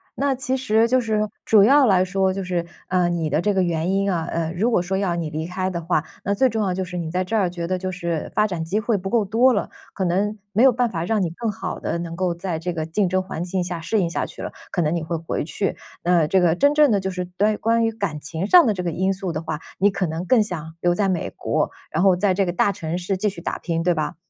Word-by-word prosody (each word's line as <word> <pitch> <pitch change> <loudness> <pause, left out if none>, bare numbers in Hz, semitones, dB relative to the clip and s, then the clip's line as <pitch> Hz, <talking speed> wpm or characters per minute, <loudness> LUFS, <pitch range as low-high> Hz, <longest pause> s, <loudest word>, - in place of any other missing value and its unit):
那 275 0 +1
其 255 0 -1
实 230 -3 +2
就 255 +2 +3
是， 220 -2 0 0.2
主 210 -3 +5
要 275 +5 +6
来 190 -5 +4
说 190 0 +1
就 195 0 -3
是， 175 -2 -1 0.2
呃， 180 -1 +2
你 170 -2 -1
的 155 - +1
这 205 +2 +1
个 190 - +2
原 170 0 0
因 195 0 +1
啊， 165 -3 -1
呃， 165 0 -2
如 220 +7 +1
果 220 - +3
说 190 +2 -2
要 190 -3 0
你 165 -2 -2
离 155 +1 -4
开 185 +2 -2
的 170 -2 -4
话， 165 -2 +1 0.2
那 200 - 0
最 260 +6 +3
重 220 -3 -1
要 190 -2 0
就 185 +1 -2
是 180 -1 -6
你 165 -2 -3
在 180 +2 0
这 205 - -2
儿 195 -5 +2
觉 170 -1 -5
得 185 - 0
就 185 0 -3
是 170 -3 -3
发 215 - +3
展 175 -5 -3
机 185 +6 -1
会 220 -1 0
不 195 0 -5
够 225 -1 +2
多 235 +6 +4
了， 205 - -1 0.2
可 190 - -2
能 200 +5 0 0.2
没 220 - +4
有 265 - +8
办 245 0 +1
法 165 -5 -3
让 215 +3 0
你 175 - 0
更 215 +6 -3
好 - - -5
地 - - -2
能 170 -1 -5
够 180 0 0
在 170 -1 -4
这 170 +3 -3
个 160 -2 -3
竞 180 +4 0
争 185 +1 +1
环 185 -3 -5
境 185 +1 -2
下 175 -2 -4
适 215 +6 0
应 175 -3 +1
下 170 - -2
去 - - -10
了， - - -5 0.2
可 175 - 0
能 160 +1 +1
你 170 - -2
会 165 +1 -2
回 165 - -3
去。 185 +5 -2 0.3
呃， 175 -2 +3
这 190 +4 +3
个 175 -2 +3
真 285 +9 +3
正 300 -1 +5
的 210 - +3
就 190 0 -2
是， 180 -1 -3
关 210 +1 +2
关 230 +1 +2
于 225 - +1
感 200 -8 -3
情 165 +6 -4
上 355 +3 +7
的 220 - +2
这 185 - -4
个 175 - -2
因 190 +4 0
素 190 -2 -4
的 155 - -3
话， 160 -2 -4 0.2
你 200 +2 +5
可 195 -1 -1
能 165 +3 -4
更 235 +4 +4
想 165 -6 -4
留 175 0 +2
在 195 +1 +1
美 180 -3 -1
国， - - -1 0.2
然 160 - 0
后 190 -1 +5
在 190 +1 +2
这 195 +1 +1
个 175 - -2
大 200 - +2
城 175 -3 -4
市 185 +2 -2
继 210 - 0
续 190 -4 -4
打 - - -3
拼， 165 -1 -2
对 175 +1 +3
吧？ 155 -2 -2
185 Hz, 315 characters per minute, -22 LUFS, 170-210 Hz, 0.3 s, 有